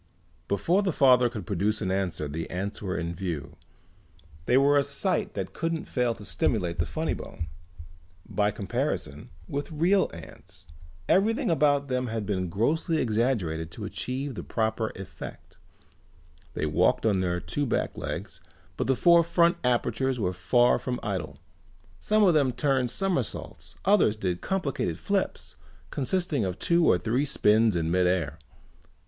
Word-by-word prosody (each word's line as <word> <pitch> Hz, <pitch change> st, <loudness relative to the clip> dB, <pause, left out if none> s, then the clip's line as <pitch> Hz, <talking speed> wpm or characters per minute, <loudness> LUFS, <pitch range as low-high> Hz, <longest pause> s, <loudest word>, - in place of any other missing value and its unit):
Before 170 Hz, -, +2 dB
the 195 Hz, -2 st, 0 dB
father 125 Hz, -4 st, +5 dB
could 110 Hz, -3 st, -7 dB
produce 105 Hz, +1 st, 0 dB
an 95 Hz, -3 st, -2 dB
answer 95 Hz, -5 st, -1 dB
the 80 Hz, +3 st, -5 dB
ants 100 Hz, +4 st, -4 dB
were 95 Hz, -3 st, -2 dB
in 85 Hz, 0 st, -3 dB
view. 85 Hz, -6 st, -5 dB, 0.9 s
They 125 Hz, -, +4 dB
were 140 Hz, +1 st, +5 dB
a 145 Hz, -, +5 dB
sight 190 Hz, +8 st, -1 dB
that -, -, -4 dB
couldn't 165 Hz, -1 st, -2 dB
fail 125 Hz, -3 st, 0 dB
to 105 Hz, -, -11 dB
stimulate 90 Hz, -2 st, -1 dB
the 80 Hz, -, +1 dB
funny -, -, -2 dB
bone. 80 Hz, -, -7 dB, 0.8 s
By 105 Hz, 0 st, +1 dB
comparison 95 Hz, -7 st, -3 dB, 0.2 s
with 145 Hz, +3 st, -4 dB
real 175 Hz, +6 st, +2 dB
ants 90 Hz, +2 st, -12 dB, 0.4 s
everything 210 Hz, 0 st, +2 dB
about 145 Hz, -3 st, +3 dB
them 125 Hz, -1 st, -1 dB
had 110 Hz, -2 st, -3 dB
been 95 Hz, -3 st, -1 dB
grossly 155 Hz, -, 0 dB
exaggerated 110 Hz, -, 0 dB
to -, -, -6 dB
achieve 130 Hz, +2 st, -3 dB
the -, -, -5 dB
proper 110 Hz, 0 st, -1 dB
effect. 95 Hz, -, -10 dB, 1.0 s
They -, -, -1 dB
walked 75 Hz, +7 st, +2 dB
on 100 Hz, -4 st, +3 dB
their 90 Hz, -1 st, 0 dB
two 145 Hz, +9 st, -2 dB
back -, -, -1 dB
legs 85 Hz, -1 st, -5 dB, 0.4 s
but -, -, -1 dB
the 135 Hz, -, +3 dB
four 170 Hz, +4 st, +6 dB
front 170 Hz, +1 st, +3 dB
apertures 125 Hz, +1 st, 0 dB
were 90 Hz, -4 st, 0 dB
far 120 Hz, +8 st, +3 dB
from 125 Hz, -1 st, -3 dB
idle. 95 Hz, -10 st, -3 dB, 0.6 s
Some 215 Hz, 0 st, +2 dB
of 185 Hz, -4 st, +5 dB
them 140 Hz, -5 st, +3 dB
turned 130 Hz, 0 st, +1 dB
somersaults, 175 Hz, -, -3 dB
others 195 Hz, -, +4 dB
did 90 Hz, -4 st, -2 dB
complicated 140 Hz, -, -2 dB
flips 85 Hz, -, -2 dB, 0.3 s
consisting 150 Hz, -, 0 dB
of 90 Hz, -2 st, -2 dB
two 170 Hz, -1 st, +2 dB
or -, -, +5 dB
three 115 Hz, +8 st, 0 dB
spins 110 Hz, -6 st, +3 dB
in 80 Hz, -1 st, 0 dB
mid 90 Hz, 0 st, +3 dB
air. 85 Hz, -4 st, -1 dB
115 Hz, 155 wpm, -27 LUFS, 90-145 Hz, 1.0 s, four